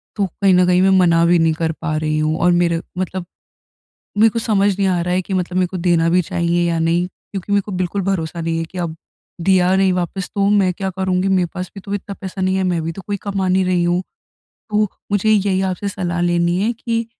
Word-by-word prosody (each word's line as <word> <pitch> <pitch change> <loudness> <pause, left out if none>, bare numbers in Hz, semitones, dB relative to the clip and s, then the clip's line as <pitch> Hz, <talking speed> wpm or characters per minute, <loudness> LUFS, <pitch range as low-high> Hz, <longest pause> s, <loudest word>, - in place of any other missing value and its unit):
तो 205 - +1
कहीं 190 +2 +1
न 180 0 +5
कहीं 180 0 +4
मैं 195 - +4
मना 170 -2 +4
भी 175 0 +4
नहीं 165 -1 +3
कर 160 0 -1
पा 155 -2 -2
रही 155 0 -1
हूँ 155 +1 0
और 175 0 +4
मेर 170 -1 +2 0.2
मतलब 185 -1 -3 0.9
मेरे 220 +1 +6
को 230 - -3
समझ 205 -3 +2
नहीं 195 - +2
आ 180 -2 +1
रहा 180 +1 -1
है 185 - +1
कि, 190 - -5
मतलब 180 0 -1
मेरे 180 - +3
को 185 - -6
देना 170 -2 +2
भी 180 +1 +3
चाहिए 175 -1 0
या 165 -1 0
नहीं 170 +2 +1
क्योंकि 195 +1 -8
मेरे 200 - +4
को 205 - -8
बिल्कुल 185 +2 -2
भरोसा 170 -3 -2
नहीं 165 0 -1
है, 165 - -1
कि 180 +3 -10
अब 165 -2 -3 0.5
दिया 185 0 +3
नहीं 190 -1 +3
वापिस, 180 +1 -3
तो 200 0 +2
मैं 195 -3 +3
क्या 190 0 -3
करूँगी? 190 0 -1
मेरे 185 -2 +2
पास 185 -1 -5
भी 195 - -8
तो 200 +1 -5
इतना 200 0 -5
पैसा 190 0 -6
नहीं 185 0 +1
है, 190 - 0
मैं 175 -3 0
भी 165 +1 -3
तो 195 - -9
कोई 205 -1 -2
कमा 195 -2 -2
नहीं 185 +1 +2
रही 180 -1 +1
हूँ। 175 +1 +1 0.7
तो, 210 -1 +2 0.2
मुझे 205 +1 +1
यही 200 -2 +2
आपसे 200 +2 -3
सलाह 175 -3 -3
लेनी 175 0 +1
है 230 +3 +1
कि, 230 0 -3
180 Hz, 250 wpm, -19 LUFS, 170-195 Hz, 0.9 s, मेरे